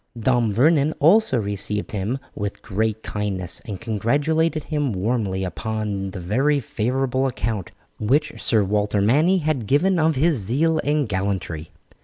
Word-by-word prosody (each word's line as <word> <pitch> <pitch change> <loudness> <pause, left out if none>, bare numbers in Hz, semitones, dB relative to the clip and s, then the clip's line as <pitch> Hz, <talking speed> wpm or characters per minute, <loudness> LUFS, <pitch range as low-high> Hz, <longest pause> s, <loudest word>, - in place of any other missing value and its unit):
Dame 120 -1 +2
Vernon 145 +6 +3
also 185 - +4
received 105 0 -2
him 105 +5 -2 0.2
with 100 -1 -5
great 110 0 -1
kindness, 100 -4 -1
and 100 -5 -6
congratulated 145 +9 0
him 145 -6 -1
warmly 95 -1 -1
upon 105 0 -3
the 95 - -7
very 135 +11 +1
favourable 130 +3 -1
account 110 -6 -3 0.3
which 145 +8 0
Sir 110 -3 +3
Walter 105 +1 0
Manny 150 - +3
had 150 - -1
given 175 - +3
of 160 0 +2
his 150 0 +2
zeal 150 +11 +1
and 145 -2 +1
gallantry. 95 -5 -3
115 Hz, 140 wpm, -22 LUFS, 100-145 Hz, 0.3 s, also